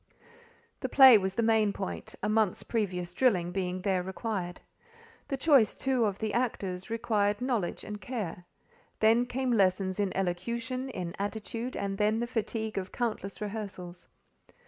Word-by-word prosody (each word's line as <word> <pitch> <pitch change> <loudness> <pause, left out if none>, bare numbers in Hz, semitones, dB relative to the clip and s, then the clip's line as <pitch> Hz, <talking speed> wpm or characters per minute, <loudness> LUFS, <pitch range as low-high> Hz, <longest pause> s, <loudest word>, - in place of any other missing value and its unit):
The - - -3
play 260 -5 +9
was 190 0 -2
the 230 - +1
main 220 -2 +3
point; 85 - -5
a - - +1
month's 215 -3 +1
previous 180 -6 -2
drilling 180 -9 +2
being 185 -1 -2
there 190 -2 +1
required. 190 -1 -4 0.7
The 275 - -2
choice, 270 -6 +4
too, 260 -3 +1
of 200 -2 -1
the 215 -1 -3
actors 195 -7 -2
required 210 -2 +1
knowledge 240 -8 -1
and 210 0 -7
care; 205 -9 -4 0.6
then 230 +3 +4
came 255 0 -1
lessons 190 -2 +2
in 200 -2 +1
elocution, 235 +8 -2
in 180 -8 -5
attitude, 220 +4 -4
and 195 -1 -3
then 215 +2 +2
the 240 - 0
fatigue 220 -3 -2
of 185 0 -7
countless 215 -5 -3
rehearsals. 200 -4 -6
210 Hz, 150 wpm, -29 LUFS, 190-230 Hz, 0.7 s, play